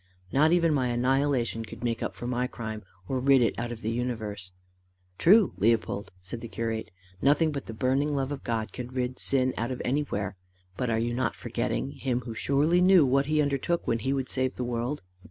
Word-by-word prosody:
Not 150 Hz, +4 st, +4 dB
even 170 Hz, -2 st, +4 dB
my 130 Hz, -3 st, +1 dB
annihilation 125 Hz, -1 st, +1 dB
could 115 Hz, +1 st, -10 dB
make 115 Hz, -1 st, -1 dB
up -, -, -3 dB
for -, -, -7 dB
my 125 Hz, 0 st, 0 dB
crime, 110 Hz, -3 st, -6 dB, 0.3 s
or 130 Hz, -, -1 dB
rid 135 Hz, +1 st, +5 dB
it 115 Hz, -, +2 dB
out 120 Hz, 0 st, -3 dB
of 120 Hz, -1 st, -8 dB
the 110 Hz, -, 0 dB
universe." 110 Hz, -6 st, -3 dB, 0.7 s
"True, 200 Hz, +2 st, +6 dB
Leopold!" 110 Hz, -1 st, +1 dB
said 115 Hz, +6 st, -6 dB
the 115 Hz, -, -6 dB
curate. 115 Hz, 0 st, -3 dB, 0.3 s
"Nothing 150 Hz, +3 st, +4 dB
but 140 Hz, -2 st, -5 dB
the 115 Hz, -, -6 dB
burning 135 Hz, +4 st, +1 dB
love 135 Hz, 0 st, -1 dB
of 145 Hz, -, -5 dB
God 115 Hz, -2 st, -2 dB
can 125 Hz, -1 st, -5 dB
rid 125 Hz, 0 st, -3 dB
sin 130 Hz, -2 st, +1 dB
out 115 Hz, +2 st, -1 dB
of 130 Hz, -, -4 dB
anywhere. 105 Hz, -8 st, -1 dB, 0.4 s
But 125 Hz, -2 st, -1 dB
are 110 Hz, -, +1 dB
you 120 Hz, +1 st, 0 dB
not 130 Hz, +2 st, 0 dB
forgetting 65 Hz, +3 st, -2 dB
him 125 Hz, -, -2 dB
who 120 Hz, -1 st, -6 dB
surely 140 Hz, +10 st, +2 dB
knew 180 Hz, -4 st, +7 dB
what 135 Hz, +2 st, +2 dB
he 155 Hz, 0 st, +3 dB
undertook 145 Hz, +4 st, 0 dB
when 115 Hz, -, +1 dB
he 130 Hz, +5 st, -1 dB
would 135 Hz, -2 st, -1 dB
save 130 Hz, -1 st, -1 dB
the 125 Hz, -, -3 dB
world? 120 Hz, +2 st, -2 dB
125 Hz, 210 wpm, -28 LUFS, 115-140 Hz, 0.7 s, knew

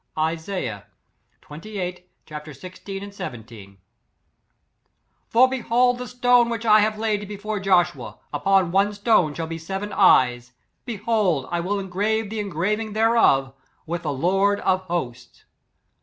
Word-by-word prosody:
Isaiah^ 160 Hz, -, -3 dB, 0.6 s
xxviii 180 Hz, +4 st, -5 dB
ch, 180 Hz, 0 st, -22 dB, 0.3 s
iQ 150 Hz, 0 st, -7 dB
b^ 185 Hz, +6 st, -8 dB
i7 125 Hz, -, -7 dB
v, 100 Hz, -4 st, -13 dB, 0.8 s
" -, -, -48 dB
For 250 Hz, +3 st, +5 dB
behold 245 Hz, -1 st, +1 dB
the 250 Hz, -, -5 dB
stone 245 Hz, -1 st, +3 dB
which 230 Hz, 0 st, -4 dB
I 215 Hz, -1 st, +6 dB
have 215 Hz, 0 st, +1 dB
laid 210 Hz, -2 st, -1 dB
before 210 Hz, +1 st, -4 dB
Joshua: 180 Hz, -3 st, +1 dB, 0.2 s
upon 195 Hz, -3 st, +2 dB
one 200 Hz, +3 st, +2 dB
stone 200 Hz, -8 st, +2 dB
shall 165 Hz, -, -3 dB
be 165 Hz, 0 st, -6 dB
seven 195 Hz, +5 st, -5 dB
eyes. 125 Hz, -7 st, +3 dB, 0.3 s
Behold 210 Hz, -, 0 dB
I 175 Hz, -, 0 dB
will 190 Hz, +4 st, -1 dB
engrave 200 Hz, +3 st, -1 dB
the 220 Hz, -, -3 dB
engraving 205 Hz, +3 st, -2 dB
thereof, 215 Hz, -, +3 dB, 0.3 s
with 170 Hz, +2 st, -4 dB
the 155 Hz, -4 st, -2 dB
lord 195 Hz, +8 st, +1 dB
of 185 Hz, 0 st, +1 dB
HOSTS." 150 Hz, -9 st, -5 dB
195 Hz, 140 wpm, -23 LUFS, 165-215 Hz, 0.8 s, I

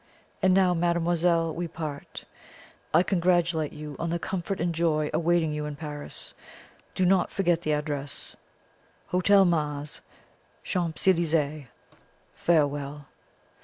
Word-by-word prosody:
And 185 Hz, -1 st, +4 dB
now, 185 Hz, -2 st, +4 dB
mademoiselle, 170 Hz, -1 st, +1 dB
we 175 Hz, +2 st, -3 dB
part. 155 Hz, -3 st, -7 dB, 0.7 s
I 175 Hz, -, +5 dB
congratulate 175 Hz, -4 st, +1 dB
you 150 Hz, -1 st, -8 dB
on 170 Hz, -, -2 dB
the 170 Hz, -, 0 dB
comfort 185 Hz, +2 st, -3 dB
and 170 Hz, +1 st, 0 dB
joy 155 Hz, -2 st, +1 dB
awaiting 170 Hz, -1 st, +2 dB
you 150 Hz, 0 st, -3 dB
in 150 Hz, -, -5 dB
Paris. 145 Hz, -1 st, -7 dB, 0.6 s
Do 185 Hz, -, +2 dB
not 185 Hz, 0 st, +3 dB
forget 175 Hz, -3 st, +1 dB
the 155 Hz, -2 st, 0 dB
address 145 Hz, -1 st, -4 dB, 0.7 s
Hotel 195 Hz, +2 st, +5 dB
Mars, 150 Hz, -3 st, -1 dB, 0.6 s
Champs 170 Hz, -1 st, -1 dB
Elysees. 155 Hz, -5 st, +2 dB, 0.7 s
Farewell!" 145 Hz, -3 st, 0 dB
165 Hz, 120 wpm, -27 LUFS, 150-175 Hz, 0.7 s, I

